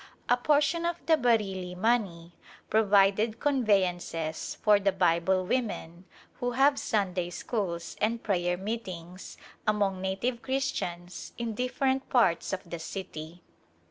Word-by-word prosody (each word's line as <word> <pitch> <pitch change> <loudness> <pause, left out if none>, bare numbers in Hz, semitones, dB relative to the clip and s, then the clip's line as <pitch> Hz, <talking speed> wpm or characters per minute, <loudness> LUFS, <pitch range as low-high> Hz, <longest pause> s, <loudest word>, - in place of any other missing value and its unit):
A 245 - +6
portion 300 +6 +2
of 345 0 -2
the 325 - +5
Bareilly 200 -9 0
money 185 -6 0 0.4
provided 210 +1 +3
conveyances 185 - 0
for 210 -1 +6
the 195 0 +2
Bible 185 0 +2
women 185 -7 -3 0.3
who 245 0 -1
have 275 +3 +4
Sunday 185 -4 -1
schools 175 -3 -3
and 230 +2 0
prayer 180 -3 0
meetings 185 -4 -6 0.3
among 200 -3 +1
native 195 +6 -2
Christians 180 -10 -3
in 235 -2 -3
different 260 +3 -1
parts 230 -9 +2
of 190 -1 -4
the 170 0 -6
city. 165 -1 -7
200 Hz, 120 wpm, -29 LUFS, 180-240 Hz, 0.4 s, A